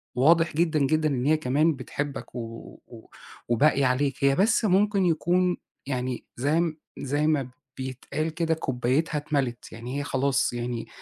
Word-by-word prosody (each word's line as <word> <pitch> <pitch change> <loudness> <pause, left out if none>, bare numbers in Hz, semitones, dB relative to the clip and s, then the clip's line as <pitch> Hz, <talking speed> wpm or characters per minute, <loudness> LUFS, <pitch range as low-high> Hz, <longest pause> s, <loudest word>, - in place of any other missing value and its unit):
واضح 165 +6 +4
جدًا، 160 -2 +2
جدًا 155 +3 +2
إن 130 -3 -1
هي 155 +2 +4
كمان 150 +4 +2
بتحبّك 140 +2 -5
و - - -3 0.5
و 115 -2 -13 0.4
وباقية 135 +3 +3
عليك، 140 +2 0
هي 140 0 +4
بس 215 - +3
ممكن 200 0 +3
يكون 175 +2 +2 0.3
يعني 130 -2 -3
زي 155 +5 +1 0.2
زي 145 +3 0
ما 140 -5 +1 0.3
بيتقال 130 +4 -3
كده 165 0 0
كوبايتْها 135 +1 0
اتْمَلِت، 140 -5 -2
يعني 120 +5 -5
هي - - -2
خلاص 135 -2 +1
يعني 120 -1 -4
145 Hz, 145 wpm, -26 LUFS, 130-160 Hz, 0.5 s, واضح